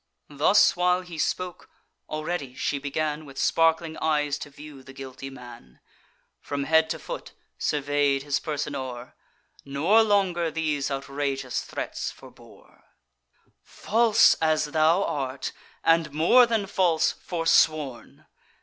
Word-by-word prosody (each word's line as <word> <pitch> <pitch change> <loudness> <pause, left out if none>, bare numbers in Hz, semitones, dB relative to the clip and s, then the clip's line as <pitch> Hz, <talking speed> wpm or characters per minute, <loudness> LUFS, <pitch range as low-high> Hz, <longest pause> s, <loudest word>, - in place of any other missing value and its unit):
Thus 155 +8 +4
while 180 +1 +2
he 175 -3 -9
spoke, 180 +3 -3 0.4
already 155 -4 -4
she 140 - -2
began, 150 +2 -2
With 135 -2 -13
sparkling 165 +1 +2
eyes, 150 -2 0
to - - -8
view 145 -1 -12
the 135 0 -13
guilty 135 0 -8
man; 120 - -13 0.6
From 140 -1 -4
head 160 +2 +3
to 160 - -2
foot - - -8 0.3
survey'd 145 -1 0
his 145 -1 0
person 150 -2 -4
o'er, 125 -3 -6 0.5
Nor 160 +11 +3
longer 190 -6 +1
these 155 -3 -2
outrageous 140 -1 -3
threats - - -5
forebore: - - -17 0.8
"False 225 0 +3
as 155 -1 +2
thou 160 +5 +2
art, 135 -4 -3 0.3
and, 165 -2 +3
more 170 - +5
than 225 -3 0
false, 180 -4 +2
forsworn! 155 -5 0
150 Hz, 120 wpm, -25 LUFS, 140-165 Hz, 0.8 s, more